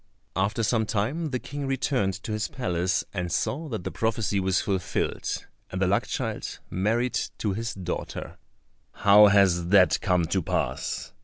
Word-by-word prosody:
After 100 +4 0
some 110 0 +1
time 130 +11 -1
the 130 - -1
King 145 +2 -5
returned 130 -7 0
to - - -5
his 110 +1 -1
palace 90 -8 -1
and 90 -3 -3
saw 155 +3 -1
that 110 -7 -4
the - - -4
prophecy 110 -3 0
was 95 -1 +2
fulfilled, 95 -3 -2 0.3
and 95 - -3
the 95 - +3
luck 95 +2 +1
child - - -3
married 115 +6 +1 0.2
to 105 -3 -1
his 115 +2 -3
daughter. 90 -2 -5 0.5
"How 105 +1 +7
has 95 -4 +4
that 90 -3 +5
come 90 -2 +2
to 95 +4 0
pass?" - - -2
100 Hz, 160 wpm, -26 LUFS, 95-115 Hz, 0.5 s, How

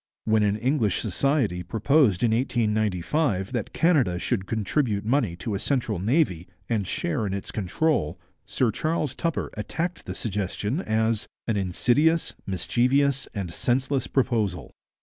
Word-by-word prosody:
When 110 -1 +3
an 105 0 +2
English 115 -5 +1
society 135 - 0
proposed 110 - +2
in 115 - +3
1895 110 - 0
that 120 -5 -3
Canada 145 - +2
should 95 0 -2
contribute 110 -1 0
money 115 -7 +1
to 105 +5 -4
a 100 - -1
central 120 -8 -1
navy 100 - +1 0.2
and 105 -5 -1
share 150 - -1
in 95 - -2
its 100 - -5
control, 105 - 0 0.3
Sir 125 -4 +1
Charles 155 +2 -1
Tupper 165 -1 -2
attacked 165 - -4
the - - -4
suggestion 105 - -2
as 110 - 0 0.2
'an 110 - +1
insidious, 125 - +2
mischievous, 130 +8 +1
and 95 -5 -4
senseless 130 +5 0
proposal.' 115 -9 0
115 Hz, 135 wpm, -25 LUFS, 100-140 Hz, 0.3 s, When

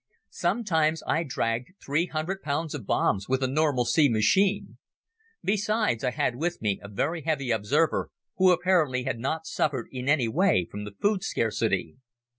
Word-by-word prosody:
Sometimes 160 -8 0
I 160 - +1
dragged 125 -1 -2
three 155 +5 +1
hundred 175 +5 -3
pounds 150 +2 -2
of 130 -9 -7
bombs 100 +1 +1
with 130 0 +1
a - - +2
normal 140 -2 +1
C 145 +3 +4
machine. 190 - +1 0.6
Besides, 210 - 0
I 125 - +2
had 125 0 -1
with 175 +4 -2
me 105 -3 -1
a 100 - -9
very 150 +11 -2
heavy 140 -5 -1
observer 125 +10 +1 0.3
who 185 0 +5
apparently 170 -8 +2
had 115 - -3
not 160 +6 -2
suffered 135 -6 -1
in 130 +1 -4
any 140 -5 +3
way 155 - +2
from 105 +1 -6
the 105 -1 -9
food 205 -2 +2
scarcity. 110 -6 -1
145 Hz, 165 wpm, -27 LUFS, 120-170 Hz, 0.6 s, who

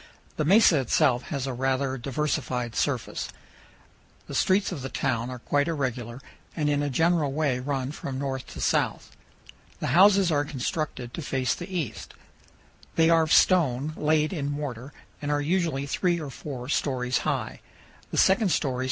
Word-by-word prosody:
The 155 - -1
mesa 190 -3 +6
itself 130 0 +2
has 140 -3 -2
a 135 - -3
rather 135 +1 0
diversified 125 -3 -2
surface. - - -2 1.0
The - - -9
streets 195 +1 +2
of 165 -7 -5
the 135 - -5
town 125 -4 -1
are 130 - -5
quite 145 +4 0
irregular, 125 -6 -3 0.4
and 150 -2 +1
in 145 0 +1
a 145 - -1
general 160 0 +2
way 140 -3 0
run 135 0 -2
from 140 -3 -6
north 135 -1 -3
to - - -8
south. - - 0 0.6
The 125 - -1
houses 190 +1 +6
are 145 -1 +2
constructed 135 -2 -4
to - - -5
face 130 -4 0
the 175 +2 -8
east. 155 - -4 0.8
They 165 0 +4
are 165 -1 +5
of 160 -1 -1
stone 155 -5 +4
laid 155 +2 +1
in 145 -5 -2
mortar, 140 -3 -5 0.3
and 145 - -3
are 145 0 +1
usually 155 -3 0
three 175 +5 0
or 150 -4 -6
four 130 -3 -7
stories 125 -3 0
high. - - -2
145 Hz, 155 wpm, -26 LUFS, 130-155 Hz, 1.0 s, mesa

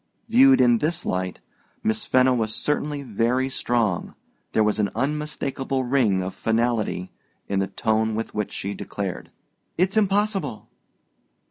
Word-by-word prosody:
Viewed 265 +4 +6
in 120 -2 +5
this 165 +5 -1
light, 90 0 -2 0.4
Miss 220 0 0
Fenno 130 0 +4
was 110 -3 -1
certainly 150 -1 -1
very 125 +3 0
strong: 115 -8 -1 0.4
there 110 - +3
was 105 0 +1
an 105 - +2
unmistakable 135 -1 -2
ring 120 -8 +2
of 95 - -4
finality 110 -5 0 0.4
in 100 -1 0
the 95 - 0
tone 110 +1 0
with 115 - -4
which 105 -1 -2
she 100 +1 -4
declared, 100 -3 -5 0.5
"It's 190 +4 +1
impossible." 200 - +1
120 Hz, 135 wpm, -24 LUFS, 105-150 Hz, 0.5 s, Viewed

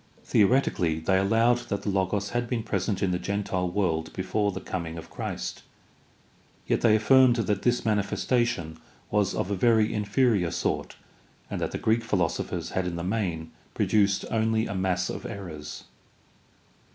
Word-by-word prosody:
The - - +6
oretically 95 -9 +2
they 95 +4 +2
allowed 115 +5 +3
that 100 - -2
the - - -1
Logos 95 +1 0
had 120 -1 -1
been 120 -3 -1
present 100 -2 -1
in 95 - +1
the 90 - 0
gentile 95 -3 -2
world 85 -4 -1
before 100 +2 0
the 95 - -5
coming 85 -4 -5
of 80 - -10
Christ, - - -5 1.0
yet - - +1
they 110 -2 +5
affirmed 125 +3 +5
that 105 -4 0
this 120 0 +1
manifestation 105 -4 0 0.3
was 105 -2 +1
of 95 - -2
a - - +1
very 110 +2 +3
inferior 105 -3 +2
sort - - -2 0.6
and - - -3
that - - 0
the - - -4
Greek 115 +1 +1
philosophers 90 -8 -1
had 95 -1 -1
in 85 - -3
the 85 - -4
main 90 -5 -2 0.2
produced 100 -2 +2
only 110 0 +1
a - - -4
mass 95 -1 0
of - - -5
errors. 80 -7 -7
100 Hz, 165 wpm, -27 LUFS, 90-110 Hz, 1.0 s, The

